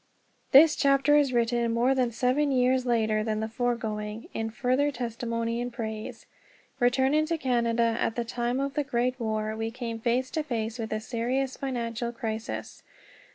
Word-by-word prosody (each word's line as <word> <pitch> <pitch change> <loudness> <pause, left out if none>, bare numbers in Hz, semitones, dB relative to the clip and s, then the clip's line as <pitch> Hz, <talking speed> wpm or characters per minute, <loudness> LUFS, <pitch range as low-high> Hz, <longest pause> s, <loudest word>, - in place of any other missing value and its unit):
THIS 300 +3 +8
chapter 275 +1 +4
is 290 -3 +4
written 235 -1 +1
more 240 +3 +3
than 255 -3 +1
seven 255 +5 +1
years 255 0 +2
later 220 -2 +1
than 215 -1 -1
the 220 - -2
foregoing, 220 -2 -3
in 225 0 -2
further 255 +5 +1
testimony 230 -1 -3
and 245 0 -3
praise. 220 -2 -6 0.5
Returning 265 +5 +3
to 330 0 0
Canada 235 -4 +1
at 225 - 0
the 240 - -2
time 240 +2 -2
of 275 0 -2
the 295 - 0
Great 255 -1 -1
War, 215 -1 -2
we 225 0 -2
came 230 -1 -5
face 245 +3 0
to 315 - -1
face 230 -5 -3
with 220 -1 -4
a 215 - -1
serious 250 +4 -2
financial 235 -3 -3
crisis. 225 -1 -5
240 Hz, 165 wpm, -27 LUFS, 225-260 Hz, 0.5 s, THIS